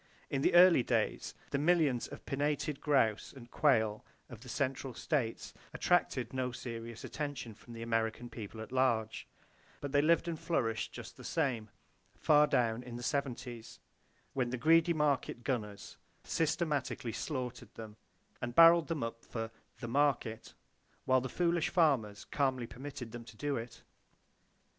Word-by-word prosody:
In 135 Hz, -, 0 dB
the 170 Hz, -, +3 dB
early 175 Hz, -5 st, +8 dB
days, -, -, -1 dB, 0.2 s
the 140 Hz, -, 0 dB
millions 150 Hz, -6 st, +2 dB
of -, -, -11 dB
pinnated 145 Hz, +1 st, -1 dB
grouse 125 Hz, -8 st, +2 dB
and 120 Hz, -3 st, -13 dB
quail 110 Hz, -7 st, +2 dB, 0.3 s
of 115 Hz, -3 st, -10 dB
the 125 Hz, -, -11 dB
central 135 Hz, -1 st, -2 dB
states 125 Hz, -8 st, -2 dB, 0.2 s
attracted 130 Hz, -9 st, +1 dB
no 130 Hz, -1 st, -1 dB
serious 115 Hz, -2 st, -7 dB
attention 145 Hz, -6 st, -5 dB
from 115 Hz, +3 st, -14 dB
the 115 Hz, 0 st, -6 dB
American 115 Hz, +1 st, -1 dB
people 110 Hz, -2 st, -8 dB
at 110 Hz, -, -9 dB
large; 120 Hz, -4 st, 0 dB, 0.5 s
but 145 Hz, -, -5 dB
they 145 Hz, 0 st, +4 dB
lived 165 Hz, +2 st, +3 dB
and 165 Hz, -2 st, -3 dB
flourished 115 Hz, -9 st, -1 dB
just -, -, -9 dB
the -, -, -11 dB
same, 115 Hz, -5 st, -1 dB, 0.5 s
far 150 Hz, -1 st, +5 dB
down 115 Hz, -4 st, +1 dB
in 125 Hz, -1 st, -8 dB
the 120 Hz, -, -6 dB
seventies, 125 Hz, -4 st, -3 dB, 0.5 s
when 125 Hz, -2 st, 0 dB
the 130 Hz, -, -2 dB
greedy 165 Hz, +6 st, +4 dB
market 145 Hz, -6 st, 0 dB
gunners 110 Hz, -6 st, -4 dB, 0.3 s
systematically 150 Hz, -7 st, -1 dB
slaughtered 130 Hz, -5 st, -4 dB
them, 110 Hz, -2 st, -9 dB, 0.5 s
and 120 Hz, 0 st, -4 dB
barreled 165 Hz, 0 st, +8 dB
them 160 Hz, -7 st, -2 dB
up 115 Hz, 0 st, -5 dB
for 115 Hz, -1 st, -5 dB, 0.3 s
"the 120 Hz, -, -4 dB
market," 120 Hz, -4 st, 0 dB, 0.5 s
while 130 Hz, 0 st, +4 dB
the 130 Hz, -, -4 dB
foolish 170 Hz, 0 st, +1 dB
farmers 135 Hz, -, +2 dB
calmly 130 Hz, -4 st, 0 dB
permitted 125 Hz, +1 st, -8 dB
them 120 Hz, 0 st, -7 dB
to 115 Hz, -2 st, -14 dB
do 145 Hz, +2 st, -1 dB
it. 115 Hz, 0 st, -7 dB
130 Hz, 155 wpm, -33 LUFS, 115-145 Hz, 0.5 s, early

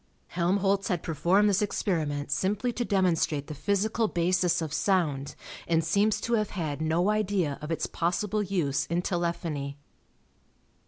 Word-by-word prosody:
Helmholtz 195 Hz, +3 st, +1 dB
had 180 Hz, -6 st, -1 dB
performed 175 Hz, +6 st, +2 dB
this 200 Hz, -1 st, +2 dB
experiment 155 Hz, -8 st, -1 dB
simply 210 Hz, +9 st, 0 dB
to 240 Hz, -, -1 dB
demonstrate 175 Hz, -8 st, +1 dB
the 155 Hz, -, -7 dB
physical 210 Hz, +7 st, 0 dB
basis 180 Hz, -1 st, +1 dB
of 160 Hz, -3 st, -4 dB
sound, 155 Hz, -6 st, 0 dB, 0.3 s
and 165 Hz, -1 st, +2 dB
seems 200 Hz, +6 st, +2 dB
to 235 Hz, -, -2 dB
have 215 Hz, -3 st, +1 dB
had 155 Hz, -6 st, -3 dB
no 165 Hz, +5 st, +2 dB
idea 195 Hz, -8 st, 0 dB
of 150 Hz, -, -6 dB
its 165 Hz, -, -1 dB
possible 205 Hz, +5 st, -1 dB
use 155 Hz, -9 st, -1 dB
in 170 Hz, +2 st, -1 dB
telephony. 170 Hz, -6 st, -2 dB
175 Hz, 145 wpm, -28 LUFS, 160-200 Hz, 0.3 s, performed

